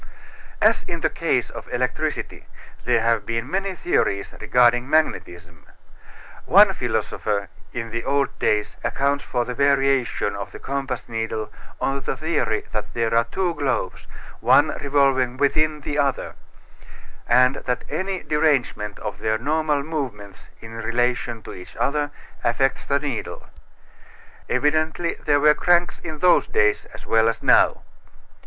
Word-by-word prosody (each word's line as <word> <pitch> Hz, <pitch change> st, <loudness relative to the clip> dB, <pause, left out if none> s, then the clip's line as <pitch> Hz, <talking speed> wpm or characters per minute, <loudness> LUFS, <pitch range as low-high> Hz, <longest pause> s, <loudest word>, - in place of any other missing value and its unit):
As -, -, +4 dB
in -, -, -5 dB
the -, -, +1 dB
case -, -, 0 dB
of -, -, -10 dB
electricity -, -, -3 dB, 0.4 s
there 120 Hz, -2 st, +3 dB
have 115 Hz, -2 st, +1 dB
been 115 Hz, +3 st, -3 dB
many 195 Hz, 0 st, -1 dB
theories 100 Hz, -, 0 dB
regarding 120 Hz, +1 st, +3 dB
magnetism. 85 Hz, -, -1 dB, 0.8 s
One -, -, +6 dB
philosopher 100 Hz, -2 st, -2 dB, 0.2 s
in 115 Hz, -2 st, -5 dB
the 115 Hz, +1 st, -3 dB
old 140 Hz, -2 st, 0 dB
days 105 Hz, -1 st, 0 dB
accounts 140 Hz, +1 st, 0 dB
for 120 Hz, -1 st, -1 dB
the 125 Hz, -, -4 dB
variation 135 Hz, -6 st, +1 dB
of 100 Hz, -1 st, -6 dB
the -, -, -7 dB
compass 135 Hz, -3 st, -4 dB
needle 115 Hz, -2 st, -4 dB, 0.3 s
on 135 Hz, 0 st, -1 dB
the 135 Hz, -, -3 dB
theory 155 Hz, -8 st, -1 dB
that 105 Hz, -, -5 dB
there 115 Hz, -1 st, 0 dB
are 115 Hz, 0 st, +3 dB
two 175 Hz, +8 st, -1 dB
globes, 130 Hz, -, -2 dB, 0.3 s
one -, -, +5 dB
revolving 135 Hz, -3 st, +2 dB
within 150 Hz, +2 st, +1 dB
the 145 Hz, +1 st, -3 dB
other, 140 Hz, -2 st, 0 dB, 1.0 s
and 125 Hz, +2 st, +5 dB
that 125 Hz, -1 st, -3 dB
any 185 Hz, +4 st, -3 dB
derangement 140 Hz, -9 st, 0 dB
of 105 Hz, -2 st, -6 dB
their 110 Hz, +1 st, 0 dB
normal 150 Hz, +2 st, 0 dB
movements 125 Hz, -11 st, -6 dB
in 115 Hz, 0 st, -9 dB
relation 120 Hz, 0 st, -1 dB
to -, -, -8 dB
each 90 Hz, -, -11 dB
other 145 Hz, +1 st, 0 dB, 0.3 s
affects 130 Hz, +3 st, +1 dB
the 140 Hz, 0 st, +1 dB
needle. 140 Hz, -6 st, -5 dB, 1.0 s
Evidently 155 Hz, +3 st, +1 dB
there 145 Hz, 0 st, +3 dB
were 150 Hz, +1 st, +6 dB
cranks 175 Hz, +2 st, +2 dB
in 160 Hz, -2 st, -6 dB
those 180 Hz, +4 st, +4 dB
days 105 Hz, 0 st, +2 dB
as -, -, -13 dB
well 115 Hz, 0 st, +3 dB
as 115 Hz, -, -4 dB
now. -, -, +4 dB
130 Hz, 140 wpm, -23 LUFS, 115-145 Hz, 1.0 s, One